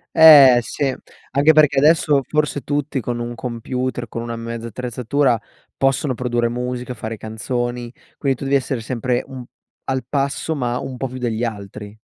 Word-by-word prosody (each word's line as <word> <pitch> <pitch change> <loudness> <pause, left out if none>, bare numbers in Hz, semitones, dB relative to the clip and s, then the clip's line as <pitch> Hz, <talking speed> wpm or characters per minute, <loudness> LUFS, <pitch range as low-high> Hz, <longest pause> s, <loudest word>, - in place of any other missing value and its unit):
Eh 145 -6 +9
sì, 135 +3 -2 0.4
anche 140 +4 +4
perché 150 -3 +5
adesso 150 -1 +4
forse 150 -2 0
tutti 145 0 -2
con 120 -1 -3
un 120 0 -4
computer, 125 +1 -4
con 115 - -5
una 115 0 -5
mezza 115 0 -6
attrezzatura 125 +2 0 0.4
possono 135 0 +1
produrre 120 -1 -1
musica, 125 +1 -4
fare 110 -1 -6
canzoni. 120 +2 -4 0.3
Quindi 135 -3 0
tu - - -8
devi 140 +1 +2
essere 135 -2 -1
sempre 125 +1 -1
un 130 -2 -8 0.4
al 130 -2 -2
passo, 140 +3 -1
ma 125 -3 -1
un 130 - -6
po' 135 - -2
più 130 +1 -8
degli 120 -2 -2
altri. 105 -1 -6
125 Hz, 165 wpm, -20 LUFS, 120-135 Hz, 0.4 s, Eh